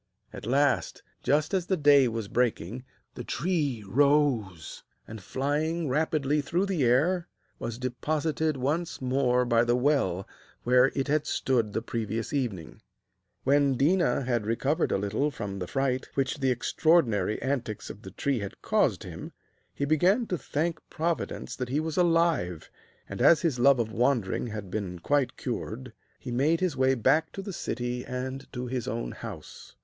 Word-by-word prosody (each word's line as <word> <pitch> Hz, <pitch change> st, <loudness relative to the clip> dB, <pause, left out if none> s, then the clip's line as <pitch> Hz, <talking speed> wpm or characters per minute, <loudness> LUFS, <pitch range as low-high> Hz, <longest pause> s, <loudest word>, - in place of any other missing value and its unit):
At -, -, -8 dB
last, 140 Hz, +2 st, +1 dB, 0.2 s
just 150 Hz, +4 st, +1 dB
as 185 Hz, -2 st, 0 dB
the 190 Hz, -, +1 dB
day 145 Hz, -3 st, +6 dB
was 115 Hz, -3 st, -3 dB
breaking, 120 Hz, -1 st, -1 dB, 0.3 s
the -, -, -7 dB
tree 145 Hz, -, -1 dB
rose, 125 Hz, -, +1 dB, 0.3 s
and, 110 Hz, -1 st, -8 dB
flying 150 Hz, -, -1 dB
rapidly 150 Hz, 0 st, +1 dB
through 175 Hz, +7 st, 0 dB
the 185 Hz, -8 st, 0 dB
air, 160 Hz, +9 st, +2 dB, 0.3 s
was 115 Hz, -1 st, -4 dB
deposited 155 Hz, +4 st, -1 dB
once 155 Hz, +6 st, -2 dB
more 125 Hz, -1 st, +1 dB
by 115 Hz, -1 st, +3 dB
the 120 Hz, 0 st, +2 dB
well 125 Hz, -9 st, +1 dB, 0.4 s
where 125 Hz, +1 st, +5 dB
it 135 Hz, 0 st, -1 dB
had 150 Hz, +1 st, +1 dB
stood 120 Hz, -5 st, 0 dB
the 110 Hz, -, -2 dB
previous 115 Hz, -1 st, -3 dB
evening. 100 Hz, -, -3 dB, 0.6 s
When 140 Hz, -1 st, +3 dB
Déna 140 Hz, -4 st, +2 dB
had 120 Hz, -4 st, -1 dB
recovered 140 Hz, +8 st, 0 dB
a -, -, +2 dB
little 105 Hz, +9 st, 0 dB
from 100 Hz, -8 st, -5 dB
the 90 Hz, -, -4 dB
fright 130 Hz, +1 st, -1 dB
which 135 Hz, +2 st, -1 dB
the 135 Hz, -1 st, +1 dB
extraordinary 120 Hz, -, +2 dB
antics 125 Hz, -6 st, -3 dB
of 100 Hz, -, -13 dB
the 95 Hz, -, -9 dB
tree 130 Hz, +6 st, -1 dB
had 100 Hz, -2 st, -7 dB
caused -, -, +1 dB
him, -, -, -8 dB, 0.4 s
he 140 Hz, -, -2 dB
began 180 Hz, -, +3 dB
to 180 Hz, -, 0 dB
thank 160 Hz, +5 st, -2 dB
Providence 165 Hz, +1 st, -3 dB
that 125 Hz, -1 st, -4 dB
he 140 Hz, +4 st, +1 dB
was 160 Hz, 0 st, -3 dB
alive, 165 Hz, -, +1 dB, 0.4 s
and, -, -, -6 dB
as 165 Hz, -2 st, +6 dB
his 150 Hz, -8 st, 0 dB
love 135 Hz, +2 st, +6 dB
of 115 Hz, -2 st, -1 dB
wandering 120 Hz, -3 st, 0 dB
had 105 Hz, -4 st, -6 dB
been 95 Hz, -4 st, -3 dB
quite 140 Hz, +9 st, 0 dB
cured, 125 Hz, 0 st, -5 dB, 0.2 s
he 125 Hz, -, -7 dB
made 145 Hz, +7 st, +2 dB
his 185 Hz, -5 st, 0 dB
way 130 Hz, 0 st, +3 dB
back 155 Hz, +7 st, +2 dB
to 195 Hz, -, -6 dB
the 195 Hz, -, -6 dB
city 125 Hz, -4 st, -3 dB
and 130 Hz, +1 st, -5 dB
to 125 Hz, 0 st, -4 dB
his 125 Hz, -1 st, -3 dB
own 115 Hz, -2 st, -3 dB
house. -, -, -10 dB
130 Hz, 165 wpm, -28 LUFS, 115-150 Hz, 0.6 s, day